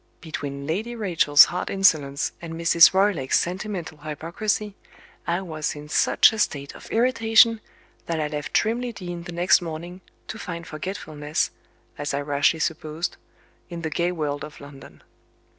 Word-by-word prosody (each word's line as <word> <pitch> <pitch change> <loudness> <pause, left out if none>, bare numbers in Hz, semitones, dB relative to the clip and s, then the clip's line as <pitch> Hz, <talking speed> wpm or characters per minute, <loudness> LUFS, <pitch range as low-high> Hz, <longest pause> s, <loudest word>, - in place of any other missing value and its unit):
Between 140 -4 -6
Lady 210 +10 -3
Rachel's 170 -9 +5
hard 180 - -4
insolence, 155 -8 +2
and 165 -1 -7
Mrs. 165 0 +6
Roylake's 190 -9 +2
sentimental 180 -3 -4
hypocrisy, 170 +8 -3 0.5
I 170 +2 0
was 155 -5 -4
in 150 0 -10
such - - +4
a 220 - -5
state 140 -7 -1
of - - -13
irritation 225 -2 +4 0.5
that 165 -1 -1
I 150 - 0
left 150 -1 -5
Trimley 235 +2 0
Deen 175 -3 -7
the 175 - -7
next 175 +2 +3
morning, 175 +2 -7 0.3
to - - -7
find 170 -1 -6
forgetfulness, 155 -3 -3 0.5
as 145 -1 -2
I 140 - -1
rashly 145 +2 +2
supposed, 160 +1 -3 0.5
in 170 -1 -7
the 160 - -3
gay 175 +2 0
world 150 -4 -3
of 150 0 -10
London. 140 -1 -13
170 Hz, 150 wpm, -24 LUFS, 150-190 Hz, 0.5 s, Mrs